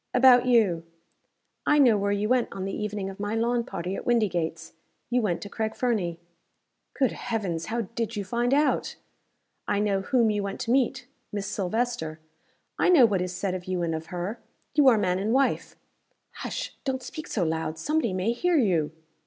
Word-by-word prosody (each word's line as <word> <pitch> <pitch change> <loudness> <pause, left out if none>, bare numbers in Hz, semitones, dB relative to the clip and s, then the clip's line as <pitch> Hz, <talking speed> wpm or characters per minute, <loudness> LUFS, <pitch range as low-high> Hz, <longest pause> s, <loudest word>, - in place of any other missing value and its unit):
"About 250 -1 +6
you. 205 -9 +3 0.8
I 295 - +5
know 255 -6 +6
where 200 0 0
you 205 +1 0
went 250 0 +2
on 190 -1 -5
the 195 - -3
evening 210 -2 -3
of 195 0 -8
my 205 +2 -2
lawn 235 +1 +1
party 185 -5 -4
at - - -5
Windygates 175 -8 0 0.4
you 250 0 +3
went 190 -6 -1
to - - -6
Craig 220 +2 -3
Fernie." 195 -9 -1 0.8
"Good 265 -3 +2
Heavens! 195 -9 -3
how 235 +2 -1
did 230 +1 -4
you 205 -1 -3
find 240 +5 0
out 290 +2 +2 0.4
?" - - -47 0.3
"I - - +1
know 200 -1 +1
whom 235 +1 +2
you 205 -1 0
went 200 0 -4
to 230 - -1
meet 260 0 +1 0.3
Miss 205 -1 -3
Silvester. 195 -5 -2 0.6
I - - +4
know 315 -9 +8
what 200 -5 +1
is 180 0 -2
said 180 +1 -2
of 180 -1 -5
you 185 -2 -1
and 165 -1 -1
of 160 0 -5
her 180 +6 -4 0.3
you 295 -2 +5
are 240 -4 +7
man 185 -3 +1
and 210 +4 0
wife." 270 +1 +1 0.6
"Hush! - - -5
don't 260 -2 -2
speak 310 - -7
so 200 - -1
loud. 160 -1 -2
Somebody 295 - 0
may 185 +4 0
hear 345 +8 +1
you!" 175 - +2
210 Hz, 195 wpm, -26 LUFS, 185-245 Hz, 0.8 s, know